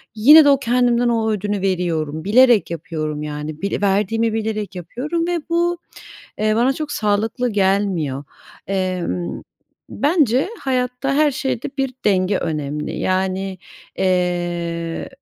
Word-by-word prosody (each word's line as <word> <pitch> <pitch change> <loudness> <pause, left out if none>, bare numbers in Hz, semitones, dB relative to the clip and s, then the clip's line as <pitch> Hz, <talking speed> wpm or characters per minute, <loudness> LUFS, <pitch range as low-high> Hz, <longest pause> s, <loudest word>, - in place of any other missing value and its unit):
yine 295 +8 +8
de - - +6
o 275 -1 +4
kendimden 245 -1 +2
o 220 -1 +1
ödünü 205 -1 -2
veriyorum. 165 -5 -1
Bilerek 225 -3 +4
yapıyorum, 155 -3 -4
yani. 150 +1 -6
Bile 200 +1 -2
verdiğimi 210 +3 +1
bilerek 215 -3 -3
yapıyorum 285 - -3
ve 350 -1 0
bu, 345 +1 +1 0.6
eee, 215 0 +1
bana 245 +3 +3
çok 300 +2 -5
sağlıklı 220 +4 0
gelmiyor, 190 -8 0 0.4
emm. 180 - -2 0.5
Bence 285 - +2
hayatta 255 +1 -1
her 300 +1 +4
şeyde 265 -3 -3
bir 270 -1 -1
denge 190 -1 +2
önemli. 150 -1 -3
Yani, 190 0 -1 0.4
eee, 175 -2 -1
205 Hz, 120 wpm, -20 LUFS, 175-250 Hz, 0.6 s, yine